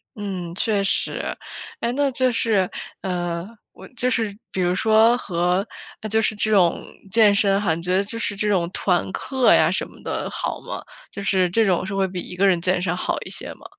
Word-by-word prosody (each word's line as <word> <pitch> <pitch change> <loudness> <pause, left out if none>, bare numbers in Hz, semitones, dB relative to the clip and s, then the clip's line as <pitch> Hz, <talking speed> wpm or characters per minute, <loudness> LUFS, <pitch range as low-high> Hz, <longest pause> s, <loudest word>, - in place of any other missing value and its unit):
嗯， 190 -5 -5
确 205 0 +1
实。 195 - -1 0.4
哎， 235 - -1
那 280 +1 +1
就 255 0 +1
是， 210 -5 +1 0.3
呃 175 -1 -3 0.3
我 - - -12
就 250 +1 +1
是 220 -4 -1
比 - - -4
如 180 0 +2
说 220 +3 +5
和 180 -1 0 0.4
呃， 215 - -5
就 220 +1 +2
是 215 - 0
这 215 +1 0
种 185 -5 +3 0.3
健 210 0 +5
身 200 -1 +3
哈， 190 -6 +1
你 165 - -4
觉 180 +2 0
得 195 - +3
就 220 +3 -5
是 210 - -2
这 210 +1 -1
种 175 -4 +1
团 180 -2 0
课 260 -2 +3
呀 - - +4
什 - - -1
么 - - -17
的 - - -3
好 - - -3
吗？ - - -7 0.3
就 200 - -6
是 190 -2 +2
这 225 +5 +3
种 185 -2 +1
是 195 +1 -4
会 195 0 +2
比 180 0 -5
一 180 - -7
个 190 +2 +2
人 185 -3 +4
健 180 +1 +1
身 180 -1 0
好 - - -1
一 - - -7
些 - - -5
吗？ - - -19
195 Hz, 235 characters per minute, -22 LUFS, 180-220 Hz, 0.4 s, 说